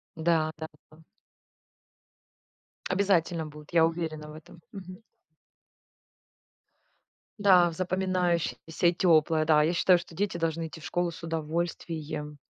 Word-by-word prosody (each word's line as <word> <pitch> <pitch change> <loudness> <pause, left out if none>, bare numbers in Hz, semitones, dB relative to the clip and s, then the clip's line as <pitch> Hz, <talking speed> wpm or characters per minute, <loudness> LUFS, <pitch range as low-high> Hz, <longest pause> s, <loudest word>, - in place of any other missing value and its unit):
Да, 160 -1 +1
да, 160 0 -6 0.2
да. 155 - -18 1.9
Обязательно 180 -4 +1
будет, 150 +2 -13
я 165 -1 +5
уверена 160 -2 -4
в - - -10
этом. 170 +2 -14
Мгм. 185 -4 -9 2.4
Да, 185 -4 +5
запоминающееся 180 -2 -1
и 170 - +3
теплое. 160 -3 +3
Да, 155 -1 +4
я 160 +3 +1
считаю, 180 +1 +4
что 170 -1 -12
дети 200 -1 -1
должны 165 0 -2
идти 160 - -11
в - - -10
школу 175 -1 -1
с 160 - -12
удовольствием. 160 -2 -4
165 Hz, 120 wpm, -28 LUFS, 155-180 Hz, 2.4 s, я